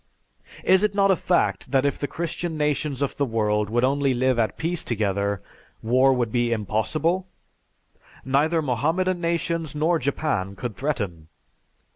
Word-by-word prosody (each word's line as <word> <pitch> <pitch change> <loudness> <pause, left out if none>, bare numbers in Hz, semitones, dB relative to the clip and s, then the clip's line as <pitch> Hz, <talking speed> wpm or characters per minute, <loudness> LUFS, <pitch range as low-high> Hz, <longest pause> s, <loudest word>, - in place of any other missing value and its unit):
Is 190 0 +5
it 210 -1 +1
not 195 -1 +4
a - - +4
fact 180 0 0
that 135 -1 +2
if 140 - 0
the 145 - -2
Christian 170 0 -4
nations 150 -2 0
of 140 - -2
the 145 - +1
world 105 -4 0
would 120 +2 +1
only 135 0 +2
live 130 0 +1
at 110 - 0
peace 170 +1 -2
together, 100 -3 -1 0.4
war 130 +4 +4
would 120 -4 0
be 120 0 +1
impossible? 140 - 0 1.0
Neither 155 +5 +2
Mohammedan 165 +8 0
nations 170 -2 -1
nor 160 +3 +2
Japan 130 -8 -1
could 120 -2 -5
threaten. 100 - -3
140 Hz, 150 wpm, -24 LUFS, 115-165 Hz, 1.0 s, Is